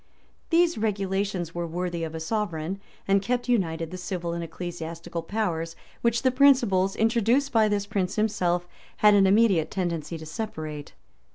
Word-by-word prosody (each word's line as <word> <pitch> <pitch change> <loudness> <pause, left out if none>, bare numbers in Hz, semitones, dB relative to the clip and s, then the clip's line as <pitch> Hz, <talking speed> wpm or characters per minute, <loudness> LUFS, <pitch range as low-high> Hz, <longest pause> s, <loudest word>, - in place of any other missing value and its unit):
[] - - -37
These 340 -4 +3
regulations 195 -4 -1
were 175 0 -3
worthy 175 0 -3
of 160 0 -4
a - - -3
sovereign, 185 -1 -2 0.3
and 195 0 +4
kept 245 +3 -1
united 165 -8 0
the 185 - -5
civil 175 -2 -3
and 170 0 -3
ecclesiastical 170 0 -6
powers, 165 -4 -2 0.3
which 235 +1 +1
the 260 - +4
principles, 245 -9 +4
introduced 235 +5 +2
by 220 -2 +4
this 205 -1 0
prince 200 -2 -1
himself, 180 -5 0 0.4
had 210 - +8
an 195 -1 +5
immediate 195 -5 +4
tendency 170 -3 -3
to 160 - -9
separate. 155 -5 -6
190 Hz, 160 wpm, -26 LUFS, 170-220 Hz, 0.4 s, had